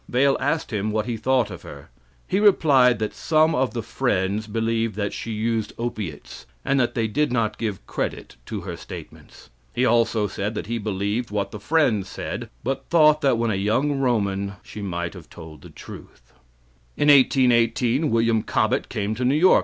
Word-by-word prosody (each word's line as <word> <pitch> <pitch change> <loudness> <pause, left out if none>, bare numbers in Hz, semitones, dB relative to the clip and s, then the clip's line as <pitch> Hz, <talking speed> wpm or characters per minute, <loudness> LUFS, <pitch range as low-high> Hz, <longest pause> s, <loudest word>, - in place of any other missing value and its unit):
Vale 135 +2 +3
asked 145 -1 -1
him 105 0 -1
what 110 0 -1
he 120 -1 -2
thought 125 +1 +1
of - - -8
her. - - -12 0.4
He 190 - +1
replied 140 - +5
that 110 0 -3
some 160 0 +2
of 130 -2 0
the 115 - -2
Friends 105 -3 -1
believed 115 0 -1
that 100 -1 -2
she - - -6
used 110 0 -1
opiates, 110 -10 -6 0.2
and 140 - +2
that 120 - 0
they 115 -2 +1
did 150 +5 0
not 115 -4 -1
give 105 -4 -4
credit - - -4
to - - -4
her - - -6
statements. - - -12 0.2
He 125 - +2
also 115 -2 +2
said 100 +2 -3
that - - -4
he 115 +2 -3
believed 105 +3 -2
what 100 -1 -2
the 105 - -7
Friends 110 -6 +1
said, - - -5
but 135 +4 -3
thought 155 -2 +5
that 135 -5 +3
when 115 -1 0
a - - 0
young 125 +9 0
Roman 100 -6 0
she 105 - -9
might 85 -3 -3
have 90 -5 -12
told 80 -3 -12
the - - -12
truth. - - -13 0.6
In 145 - +3
1818 125 0 +4
William 115 -1 +2
Cobbett - - 0
came 105 0 -2
to 120 +3 -3
New 130 +3 +3
York. 180 +5 +6
115 Hz, 185 wpm, -23 LUFS, 105-130 Hz, 0.6 s, York